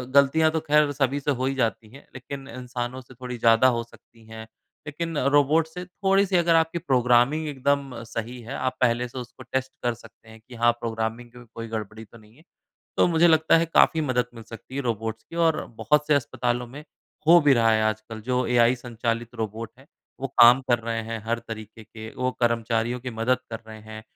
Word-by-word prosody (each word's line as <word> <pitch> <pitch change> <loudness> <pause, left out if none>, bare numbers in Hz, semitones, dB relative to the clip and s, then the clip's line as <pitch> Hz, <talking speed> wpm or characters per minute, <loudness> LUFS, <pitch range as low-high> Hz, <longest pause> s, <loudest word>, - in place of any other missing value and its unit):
ग़लतियाँ 155 +3 +5
तो 160 - 0
ख़ैर 150 -1 +4
सभी 140 0 0
से 145 +1 -1
हो - - +1
ही 135 0 -1
जाती 115 -3 -1
हैं। 135 +4 -14
लेक़िन 135 +1 -8
इंसानों 125 +1 -6
से 130 +1 -16
थोड़ी 125 0 -7
ज़्यादा 115 +2 +5
हो 115 - -2
सकती 115 -1 -21
हैं। 110 0 -10 0.4
लेकिन 165 +1 -4 0.2
रोबोट 155 +3 +3
से 180 +2 -8
थोड़ी-सी 195 +1 +1
अगर 170 -1 +3
आपकी 165 +1 +2
प्रोग्रामिंग 130 +1 +2
एकदम 140 -1 -1
सही 115 +2 -6
है 115 - -8
आप 130 0 -2
पहले 120 0 +2
से 125 - -11
उसको 125 +1 -10
टेस्ट 130 0 -1
कर 120 -1 +1
सकते 115 -1 -17
हैं 110 0 -14
कि 125 - -11
हाँ 120 - +6
प्रोग्रामिंग 115 +1 -4
में 120 0 -13
कोई 115 0 -6
गड़बड़ी 110 0 -6
तो 115 - -17
नहीं 110 +1 -20
है। 160 - -20 0.5
तो - - +4
मुझे 170 0 +4
लगता 160 0 +4
है 165 - +1
काफ़ी 160 - +5
मदद 130 -5 0
मिल 115 - -10
सकती 115 +3 -12
है - - -1
रोबोट्स 115 -1 -3
की 165 - -8
और 160 -1 +2
बहुत 150 +7 +1
से 150 - +3
अस्पतालों 125 -2 -1
में 145 +5 -11 0.4
हो 170 +1 +8
भी 145 -2 +4
रहा 115 -1 +3
है 110 0 +2
आजकल। 110 +1 -3
जो 125 +1 0
एआई 120 0 +4
संचालित 120 0 -4
रोबोट 110 0 -5
हैं 135 - -18 0.3
वो 135 - -1
काम 120 +3 +8
कर 120 - +4
रहे 115 0 -3
हैं 115 0 -5
हर 115 +1 -1
तरीक़े 110 -1 -10
के, 110 +1 -10
वो 130 0 -1
कर्मचारियों 115 +1 0
की 125 0 -5
मदद 115 +3 0
कर 115 -1 -5
रहे 110 0 -10
हैं। 110 0 -10
125 Hz, 210 wpm, -25 LUFS, 115-140 Hz, 0.5 s, हो